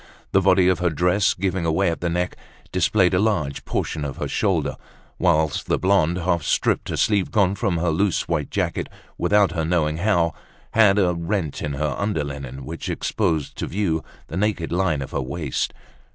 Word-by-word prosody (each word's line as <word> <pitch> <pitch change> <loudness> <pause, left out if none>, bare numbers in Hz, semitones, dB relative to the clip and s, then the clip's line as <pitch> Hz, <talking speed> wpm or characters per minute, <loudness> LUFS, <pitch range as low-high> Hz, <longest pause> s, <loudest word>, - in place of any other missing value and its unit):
The 95 - +4
body 95 -1 +4
of 95 - +2
her 90 0 +2
dress, 90 +5 +2
giving 90 -3 -1
way 90 +2 +2
at 80 - -5
the 85 - 0
neck, 90 +1 -1 0.4
displayed 90 +1 +3
a 90 - +3
large 90 -10 0
portion 75 - -2
of 70 -2 -5
her - - -3
shoulder; - - 0 0.4
whilst 75 -1 +1
the - - +2
blonde, 90 -3 +2
half 85 -1 0
stripped, - - 0
a - - -2
sleeve 100 -3 +2
gone 100 -4 +2
from 100 -3 -1
her 85 0 +1
loose 95 +4 +1
white 80 -4 -1
jacket - - -2 0.3
without 105 -2 +3
her 85 -2 -1
knowing 80 -2 +1
how, 85 -3 +2 0.4
had 105 -3 +5
a 90 -3 +3
rent 85 -2 -2
in 75 - -2
her 75 +1 -1
underlinen, 70 -9 -3
which 80 +3 -6
exposed 80 -9 -1
to - - -2
view 85 -5 -1 0.2
the 85 - -6
naked 95 -5 -1
line 85 -5 +1
of - - -9
her - - -1
waist. 70 +2 -2
85 Hz, 185 wpm, -23 LUFS, 80-95 Hz, 0.4 s, had